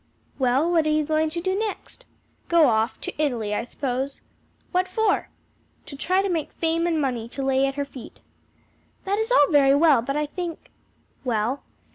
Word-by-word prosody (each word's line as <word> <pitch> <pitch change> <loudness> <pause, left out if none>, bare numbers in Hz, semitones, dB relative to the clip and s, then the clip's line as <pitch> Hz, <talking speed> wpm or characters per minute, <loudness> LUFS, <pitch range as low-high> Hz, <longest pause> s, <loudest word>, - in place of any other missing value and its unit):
"Well, 265 +6 +2
what 325 -3 +3
are - - +2
you 305 0 +2
going 310 +1 +1
to 335 +2 -4
do 375 +2 0
next?" 435 +4 -5 0.4
"Go 335 -2 +5
off 225 -2 +1
to - - -3
Italy, 235 -8 -1
I - - 0
suppose." 265 +2 -4 0.5
"What 365 0 +1
for?" 420 +2 0 0.6
"To 280 - -9
try 370 +7 +1
to - - 0
make 330 -5 -2
fame 330 +1 0
and 330 -2 +1
money 245 -5 -2
to 270 +3 -5
lay 270 0 +2
at 270 - -4
her 285 0 -2
feet." 270 -3 -12 0.9
"That 400 +2 0
is 445 +2 -1
all 290 - +5
very 280 -2 +5
well, 295 -4 +5
but 275 +5 -3
I 300 - 0
think 340 +2 -6 0.2
" - - -39
"Well?" 240 +2 -1
295 Hz, 190 wpm, -24 LUFS, 265-340 Hz, 0.9 s, Go